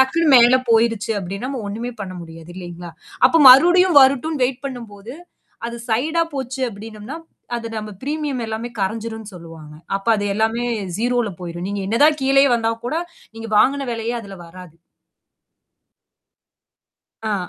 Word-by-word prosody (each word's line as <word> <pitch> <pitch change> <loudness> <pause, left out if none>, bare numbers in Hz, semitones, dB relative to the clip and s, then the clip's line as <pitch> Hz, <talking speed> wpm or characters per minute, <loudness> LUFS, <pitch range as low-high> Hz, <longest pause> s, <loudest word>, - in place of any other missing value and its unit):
டக்குனு 320 +5 +2
மேலே 245 +2 +5
போயுருச்சு 225 -1 +2
அப்டின்னா 195 +8 -5
நாம 260 -5 -5
ஒண்ணுமே 235 +4 -5
பண்ண 185 -2 -7
முடியாது 165 0 -12
இல்லீங்களா? 175 -2 -9 0.3
அப்போ 330 - +3
மறுடியும் 350 +4 +6
வரட்டும்னு 275 +2 +2
வெயிட் 255 +2 -7
பண்ணும் 245 -5 -7
போது 210 +6 -10 0.5
அது 235 0 -6
சைடா 300 +9 +1
போச்சு 265 -1 -5
அப்டினம்னா, 215 +4 -9 0.4
அது 230 - -6
நம்ம 215 0 -5
பிரீமியம் 290 -3 -3
எல்லாமே 225 +2 -4
கரஞ்சுரும்னு 220 +1 -4
சொல்லுவாங்க. 165 -3 -12 0.2
அப்ப 195 +3 -10
அது 205 - -3
எல்லாமே 225 +2 0 0.3
௦ 240 -2 0
போயுரும். 175 0 -6
நீங்க 205 0 -3
என்ன 230 +3 0
தான் 305 0 +4
கீழயே 275 +1 +4
வந்தாலும் 230 0 -2
கூட, 310 +7 -1 0.4
நீங்க 225 0 -7
வாங்கின 275 +4 +2
விலையே 230 +1 -3
அதில 200 -2 -10
வராது. 180 -1 -13 2.5
ஆ. 205 -5 -2
230 Hz, 145 wpm, -20 LUFS, 200-265 Hz, 2.5 s, மறுடியும்